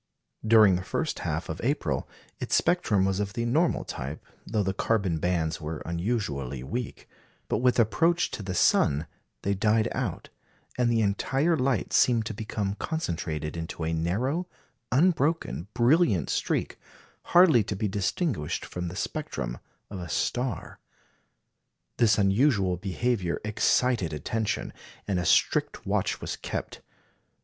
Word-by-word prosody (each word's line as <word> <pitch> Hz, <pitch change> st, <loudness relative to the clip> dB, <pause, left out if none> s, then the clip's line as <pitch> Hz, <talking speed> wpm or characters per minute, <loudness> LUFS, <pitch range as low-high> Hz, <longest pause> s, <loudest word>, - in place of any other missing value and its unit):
During 110 Hz, -4 st, +6 dB
the 90 Hz, -, -5 dB
first 155 Hz, -, -2 dB
half 80 Hz, -1 st, -3 dB
of 80 Hz, -, -5 dB
April 100 Hz, -, -1 dB, 0.3 s
its -, -, 0 dB
spectrum 105 Hz, -, +2 dB
was 95 Hz, 0 st, 0 dB
of 100 Hz, -1 st, -2 dB
the 115 Hz, -, -2 dB
normal 155 Hz, +8 st, +1 dB
type, 70 Hz, +4 st, -6 dB, 0.2 s
though 105 Hz, -1 st, 0 dB
the 95 Hz, 0 st, -1 dB
carbon 95 Hz, -5 st, 0 dB
bands 80 Hz, -2 st, -1 dB
were 75 Hz, 0 st, -5 dB
unusually 85 Hz, -, -2 dB
weak; 120 Hz, -, -5 dB, 0.4 s
but -, -, 0 dB
with 125 Hz, 0 st, +3 dB
approach 165 Hz, -, +2 dB
to -, -, -5 dB
the 95 Hz, -2 st, -4 dB
sun 75 Hz, -2 st, +3 dB, 0.4 s
they 100 Hz, -, +1 dB
died 110 Hz, +2 st, +2 dB
out, -, -, -3 dB, 0.5 s
and 120 Hz, -1 st, +2 dB
the 115 Hz, -1 st, +2 dB
entire 135 Hz, +11 st, +1 dB
light 130 Hz, -7 st, 0 dB
seemed 115 Hz, -3 st, +4 dB
to 110 Hz, -, -4 dB
become 105 Hz, -1 st, -3 dB
concentrated 80 Hz, -, -3 dB
into 80 Hz, 0 st, -5 dB
a 80 Hz, -, -1 dB
narrow, 120 Hz, -, -1 dB, 0.4 s
unbroken, 155 Hz, -, +1 dB
brilliant 120 Hz, -, +3 dB
streak, -, -, -1 dB, 0.5 s
hardly 170 Hz, -, +6 dB
to 105 Hz, -, -4 dB
be 105 Hz, +3 st, -1 dB
distinguished 100 Hz, -, -1 dB
from 90 Hz, 0 st, -5 dB
the 85 Hz, -, -6 dB
spectrum -, -, -4 dB, 0.3 s
of 100 Hz, -, -5 dB
a 85 Hz, -1 st, -7 dB
star. 125 Hz, +7 st, -2 dB, 1.2 s
This 110 Hz, -3 st, +4 dB
unusual 100 Hz, -2 st, +3 dB
behaviour 95 Hz, 0 st, -1 dB
excited 105 Hz, -3 st, +1 dB
attention, 110 Hz, +8 st, -2 dB, 0.3 s
and 95 Hz, -3 st, 0 dB
a 85 Hz, -, -2 dB
strict -, -, +2 dB
watch -, -, 0 dB
was -, -, -4 dB
kept. -, -, -5 dB
105 Hz, 140 wpm, -27 LUFS, 85-125 Hz, 1.2 s, During